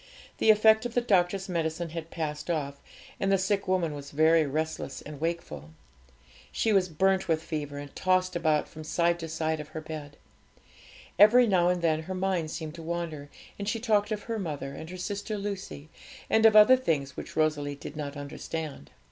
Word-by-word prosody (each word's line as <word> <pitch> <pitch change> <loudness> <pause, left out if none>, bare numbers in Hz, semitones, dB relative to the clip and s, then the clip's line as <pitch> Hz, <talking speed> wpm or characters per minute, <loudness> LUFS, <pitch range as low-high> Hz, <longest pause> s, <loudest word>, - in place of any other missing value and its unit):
The - - +3
effect 220 +1 +6
of 240 - -13
the 245 - +3
doctor's 190 -3 +1
medicine 165 -1 -2
had 165 0 -6
passed 150 -1 -4
off, 140 -4 -2 0.4
and 195 - +1
the 195 - +5
sick 195 +1 0
woman 180 -4 +1
was 140 -1 -8
very 155 +1 +4
restless 155 -1 -3
and 150 -1 -9
wakeful. 80 - -4 0.8
She 220 - +1
was 185 -2 +3
burnt 190 +4 +1
with 160 -1 0
fever, 145 -3 -4
and 145 -1 -9
tossed 185 -1 +1
about 155 -3 +1
from 155 - -10
side 170 +2 +1
to 165 - -5
side 160 0 -2
of 150 - -7
her 155 +1 -7
bed. 155 -2 -8 1.0
Every 235 +5 +8
now 180 -5 +3
and 180 -1 0
then 160 -1 +2
her 185 +4 -6
mind 185 -4 -1
seemed 155 -1 -5
to - - -8
wander, 165 -3 -4 0.3
and 200 0 -2
she 225 - -1
talked 215 -2 +1
of 210 -1 -3
her 225 -1 -3
mother 145 -6 -4
and 160 +3 -8
her 185 - -7
sister 205 +3 -4
Lucy, 195 -7 -6 0.4
and 220 0 +6
of 215 - +3
other 215 +5 +8
things 145 - -1
which - - -8
Rosalie 150 -2 0
did 145 +1 -9
not 145 -1 -5
understand. 145 - -6
165 Hz, 190 wpm, -28 LUFS, 155-195 Hz, 1.0 s, Every